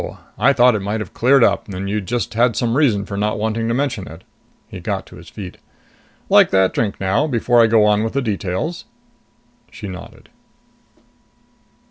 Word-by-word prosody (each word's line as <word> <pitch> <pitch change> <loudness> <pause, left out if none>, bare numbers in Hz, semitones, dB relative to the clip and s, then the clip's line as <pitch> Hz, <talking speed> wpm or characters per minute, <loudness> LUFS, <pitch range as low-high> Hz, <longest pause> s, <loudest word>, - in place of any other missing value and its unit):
I 140 - +5
thought 125 -2 +4
it 105 - -1
might 105 +3 -2
have 110 - -7
cleared 130 +1 +4
up, - - +1
and 100 -1 -5
you 105 +1 -1
just 120 +6 -3
had 115 0 +2
some 115 +1 0
reason 115 -9 +2
for 100 - -6
not 105 +2 -1
wanting 110 +1 -2
to 115 - 0
mention 125 -7 -2
it." 80 +3 -12 0.4
He - - -9
got - - -3
to - - -14
his - - -13
feet. 95 -4 -9 0.7
"Like - - +5
that 95 -1 +2
drink 105 -3 -2
now 100 +11 +1
before 120 -2 +2
I 115 - +5
go 110 -1 +4
on 105 0 +2
with 115 - -3
the 140 - 0
details?" 105 - -3 0.8
She 105 - -9
nodded. 90 -2 -11
110 Hz, 185 wpm, -19 LUFS, 100-120 Hz, 0.8 s, I